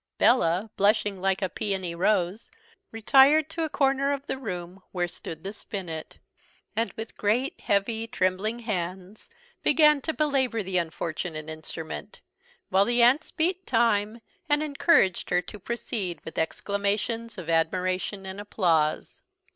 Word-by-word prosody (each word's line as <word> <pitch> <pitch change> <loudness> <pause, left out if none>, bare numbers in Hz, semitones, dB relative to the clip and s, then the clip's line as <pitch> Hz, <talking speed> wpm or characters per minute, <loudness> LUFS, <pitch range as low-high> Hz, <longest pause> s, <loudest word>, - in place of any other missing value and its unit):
Bella, 210 -3 +3
blushing 205 -1 +2
like 195 0 +1
a - - +2
peony 190 -2 -2
rose, 190 +3 0 0.4
retired 270 +7 +5
to 330 - -2
a - - -4
corner 275 -1 +2
of 280 0 -5
the 265 - -4
room, 180 -5 -6
where 175 -1 -1
stood 165 -2 -8
the 195 - -5
spinnet; 175 -7 -7 0.6
and 230 +2 0
with 220 0 -7
great, 235 +7 0
heavy, 220 +3 0
trembling 190 +3 0
hands, 190 -1 -5 0.3
began 300 -1 +5
to 320 - -1
belabour 270 -8 0
the 185 -1 0
unfortunate 160 -1 -4
instrument, 160 0 -7 0.5
while 190 +1 +4
the 240 +1 +4
aunts 265 +6 +4
beat 360 +2 -1
time, 225 -1 +1 0.3
and 295 +1 +3
encouraged 285 - +2
her 180 - +3
to 180 +4 -8
proceed 200 -5 -3
with 160 - -5
exclamations 205 +6 -1
of 180 -4 -7
admiration 185 +4 0
and 190 +2 -6
applause. 165 -7 0
205 Hz, 140 wpm, -26 LUFS, 180-235 Hz, 0.6 s, retired